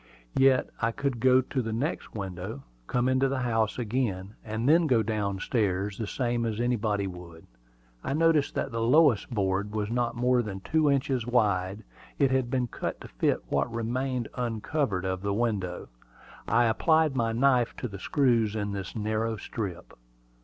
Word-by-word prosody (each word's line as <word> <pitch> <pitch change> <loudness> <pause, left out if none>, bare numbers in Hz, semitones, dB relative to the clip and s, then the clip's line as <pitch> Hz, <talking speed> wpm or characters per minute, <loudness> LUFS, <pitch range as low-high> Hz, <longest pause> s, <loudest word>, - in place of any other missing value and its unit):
Yet 135 -1 +4
I 115 0 +2
could 140 -1 -2
go 130 +2 +5
to 130 +1 -2
the 115 -1 -4
next 130 +6 -3
window, 95 +5 -5 0.2
come 125 0 +1
into 130 +1 +3
the 135 -1 -1
house 115 -3 0
again, 105 -5 -2
and 110 +2 -3
then 165 +2 +5
go 120 -5 +3
down 105 -2 -1
stairs, 100 -2 -1
the 110 - -2
same 120 0 -1
as 110 -1 -2
anybody 110 -4 0
would. 90 -3 -9 0.6
I 135 - -2
noticed 160 -2 +3
that 135 - -2
the 115 -1 -2
lowest 130 0 +4
board 100 -2 -1
was 105 0 -2
not 120 0 0
more 125 +1 +2
than 100 -4 -6
two 155 +6 +2
inches 130 -3 0
wide: 105 -4 +1 0.3
it 140 -3 +3
had 130 -2 +1
been 130 -1 0
cut 120 - -5
to - - -8
fit - - 0
what - - 0
remained 120 +1 -2
uncovered 115 -3 -1
of 95 0 -2
the 100 0 -1
window. 100 -6 -2 0.6
I 120 - +4
applied 155 +6 +3
my 115 -3 +1
knife 125 0 +2
to 125 - -4
the 100 -3 -8
screws 115 -4 +2
in 105 -1 -2
this 100 -2 -5
narrow 110 +1 -1
strip. 95 -4 -6
115 Hz, 175 wpm, -28 LUFS, 105-130 Hz, 0.6 s, go